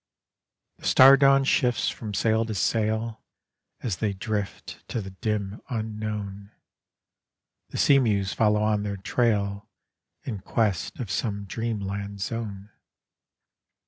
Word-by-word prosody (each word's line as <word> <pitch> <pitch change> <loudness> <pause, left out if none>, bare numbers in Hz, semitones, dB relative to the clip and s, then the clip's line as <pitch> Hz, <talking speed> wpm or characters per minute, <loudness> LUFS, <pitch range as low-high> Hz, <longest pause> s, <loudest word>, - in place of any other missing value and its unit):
The - - -5
star 135 +1 +8
dawn 135 0 +5
shifts 125 -2 +2
from 105 -3 -6
sail 110 +3 +2
to 110 -1 -4
sail, 110 +2 0 0.6
As 105 -8 -2
they 105 -2 -1
drift 100 +1 -4
to - - -3
the 95 -2 -6
dim 105 0 -3
unknown, 105 -3 -4 1.2
The - - -6
sea 140 -1 +5
mews 100 -6 +1
follow 105 -1 +2
on 105 -1 +2
their 100 -1 -3
trail 100 -1 0 0.5
In 110 -6 -4
quest 100 -2 -1
of 115 -8 -4
some 100 -1 -2
dreamland 100 -2 -4
zone. 105 -1 -5
105 Hz, 120 wpm, -26 LUFS, 100-115 Hz, 1.2 s, star